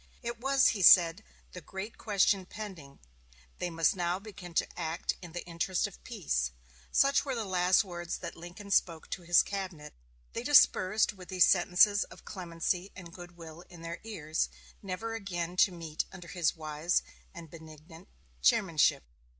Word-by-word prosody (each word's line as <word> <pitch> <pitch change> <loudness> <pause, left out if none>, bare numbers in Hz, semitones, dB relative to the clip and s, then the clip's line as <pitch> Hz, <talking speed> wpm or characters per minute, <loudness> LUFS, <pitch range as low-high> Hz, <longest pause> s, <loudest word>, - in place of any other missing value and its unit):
It 235 0 -5
was, 270 +1 +4
he 205 - -2
said, 175 +2 +7 0.3
the 180 - -9
great 195 +6 -7
question 200 -2 +1
pending 185 -11 -9 0.6
they 180 - -2
must 165 +2 +1
now 175 0 -1
begin 190 -4 -11
to - - +2
act 160 +3 -2
in 175 -3 -10
the 175 - -6
interest 170 +2 -1
of - - -9
peace. 65 -3 -2 0.4
Such 275 0 +3
were 270 -3 -3
the 225 -2 -3
last 180 0 +3
words 175 -3 -5
that - - -7
Lincoln 175 +4 -10
spoke 165 -5 +1
to 185 - -4
his 175 0 +4
cabinet. 185 -7 -6 0.4
They - - -3
dispersed 200 +4 +4
with 185 -3 -13
these 185 -2 +5
sentences 195 +3 +4
of - - -16
clemency 180 +1 -3
and 170 -3 -11
good 175 -1 -12
will 165 0 -11
in 170 -2 -13
their 170 +1 -6
ears, 160 -8 -2 0.3
never 205 +4 -5
again 180 -5 -4
to 190 - +5
meet 165 -3 -4
under 180 -3 -11
his 175 -3 0
wise 155 +2 -1 0.3
and 165 -2 -11
benignant 160 +1 -13 0.3
chairmanship. 155 - +3
175 Hz, 165 wpm, -30 LUFS, 165-195 Hz, 0.6 s, said